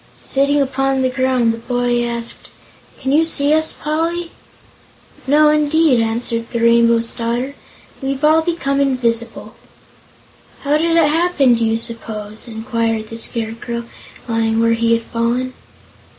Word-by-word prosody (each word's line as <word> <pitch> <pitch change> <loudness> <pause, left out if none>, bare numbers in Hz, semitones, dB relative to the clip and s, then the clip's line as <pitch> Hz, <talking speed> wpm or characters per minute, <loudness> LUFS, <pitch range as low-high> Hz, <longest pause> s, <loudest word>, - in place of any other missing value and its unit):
Sitting 280 +2 +2
upon 270 -1 0
the 255 - +1
ground, 255 -3 +1
the 230 - -7
boy 245 0 -1
asked: 235 -1 -2 0.5
"Can 265 - -2
you 305 +3 +4
see 300 -2 +1
us, 315 0 +2
Poly?" 330 +3 -3 1.0
"No, 300 +2 +5
indeed," 300 -2 +3
answered 230 +1 -2
the 235 - -3
Rainbow's 235 0 +3
Daughter; 240 +4 -3 0.5
"we've 270 +1 -3
all 310 +1 +5
become 320 -5 -1
invisible." 235 -4 -1 1.1
"How 295 +1 +2
did 330 +1 +1
it 325 -3 +5
happen, 305 -5 +2
do 230 0 0
you 225 0 +1
suppose?" 220 -1 -5
inquired 225 -1 -2
the 225 - -7
Scarecrow, 230 +1 -2 0.4
lying 225 -1 0
where 230 0 +3
he 230 0 +1
had 230 0 0
fallen. 240 +3 -2
245 Hz, 135 wpm, -18 LUFS, 230-285 Hz, 1.1 s, No